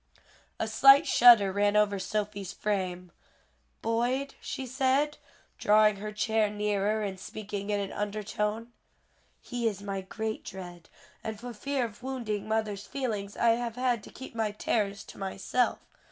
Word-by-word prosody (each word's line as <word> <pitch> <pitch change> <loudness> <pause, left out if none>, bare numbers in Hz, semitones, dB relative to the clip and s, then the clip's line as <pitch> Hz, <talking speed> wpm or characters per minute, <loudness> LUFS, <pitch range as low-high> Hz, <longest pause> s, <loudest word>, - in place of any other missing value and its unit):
A 220 - 0
slight 275 +7 +7
shudder 230 -5 +7
ran 205 +1 +2
over 205 -1 +3
Sophie's 205 -1 -3
frame. 180 -4 -2 0.7
"Boyd?" 245 +5 0
she 265 - -5
said, 270 +4 +1 0.4
drawing 210 0 +5
her 210 +2 -5
chair 215 0 +1
nearer 210 +1 0
and 190 -2 -4
speaking 205 0 -6
in 205 -1 +1
an 200 -1 -3
undertone, 210 +2 -3 0.7
"he 245 -2 -2
is 200 -2 -3
my 195 -1 -3
great 220 +3 -4
dread, 175 -3 -9 0.3
and 220 -1 -5
for 245 +1 -7
fear 270 +3 -1
of 220 -1 -10
wounding 240 -6 -3
mother's 215 -2 -2
feelings 215 -7 -3
I 235 - +4
have 230 0 0
had 250 -3 +1
to - - -11
keep 260 - -10
my 225 -2 0
terrors 205 -1 -1
to - - -13
myself. 195 +5 0
215 Hz, 150 wpm, -29 LUFS, 200-235 Hz, 0.7 s, slight